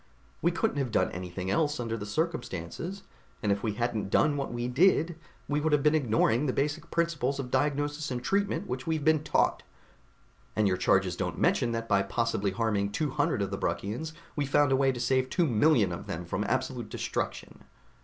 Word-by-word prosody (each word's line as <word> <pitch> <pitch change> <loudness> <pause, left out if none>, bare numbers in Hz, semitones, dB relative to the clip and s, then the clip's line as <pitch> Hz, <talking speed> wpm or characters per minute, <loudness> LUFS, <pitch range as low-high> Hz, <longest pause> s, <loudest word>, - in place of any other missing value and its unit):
We 170 - +3
couldn't 180 0 -1
have 135 -3 -1
done - - +2
anything 90 +1 -4
else 150 +5 +1
under 115 -2 -2
the 105 -2 -6
circumstances, 160 - -3 0.4
and 105 - +2
if 100 0 0
we 110 -3 -1
hadn't 115 -2 -2
done 150 +8 +3
what 140 -1 -3
we 120 0 -2
did, 165 +4 +3 0.3
we 150 +1 0
would 155 0 +1
have 145 -2 +3
been 150 0 +4
ignoring 120 -1 +2
the 130 - 0
basic 150 +3 -1
principles 160 -6 0
of 125 -2 -4
diagnosis 145 +1 0
and 125 -1 -3
treatment 200 +5 0
which 130 +3 -5
we've 160 -2 0
been 155 -1 +4
taught. - - +2 0.9
And 105 -1 +3
your 90 -1 +1
charges 95 -1 +2
don't - - -3
mention 120 - +2
that 115 0 -3
by 100 -3 +3
possibly 110 0 0
harming 100 -1 0
two 150 +2 -1
hundred - - +1
of - - -4
the - - -3
Bruckians, 125 +11 -2 0.2
we 145 - 0
found 145 0 +3
a - - +5
way 135 0 +3
to 125 - -6
save 130 +1 +1
two 175 - +2
million 120 - +3
of 85 - -6
them 85 +2 -4
from 95 +5 -2
absolute 130 -3 -2
destruction." - - -4
130 Hz, 200 wpm, -29 LUFS, 105-150 Hz, 0.9 s, a